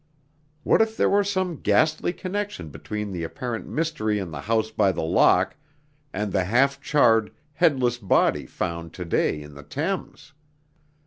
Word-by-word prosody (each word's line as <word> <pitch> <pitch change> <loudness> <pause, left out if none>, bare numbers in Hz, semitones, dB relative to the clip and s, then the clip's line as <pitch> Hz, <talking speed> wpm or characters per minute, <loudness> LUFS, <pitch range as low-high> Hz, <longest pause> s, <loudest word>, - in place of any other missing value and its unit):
What - - +4
if 220 0 0
there - - +3
were 205 +1 +4
some 185 -4 -1
ghastly 155 +12 +2
connection 195 - -4
between 105 +7 -5
the 90 -2 -4
apparent 120 - -5
mystery 150 -10 -1
in 95 -5 -4
the 75 -2 -6
House 110 +3 0
by 100 -3 +2
the 85 - -3
Lock 90 +2 +3 0.6
and 105 +1 -3
the 95 -1 +1
half 135 +7 +2
charred, 115 -8 +3 0.2
headless 130 -7 +2
body 100 -5 +2
found 85 -2 -4
to 90 - -6
day 80 -2 0
in 75 0 -11
the 70 - -11
Thames! 150 - -4
110 Hz, 155 wpm, -24 LUFS, 90-155 Hz, 0.6 s, What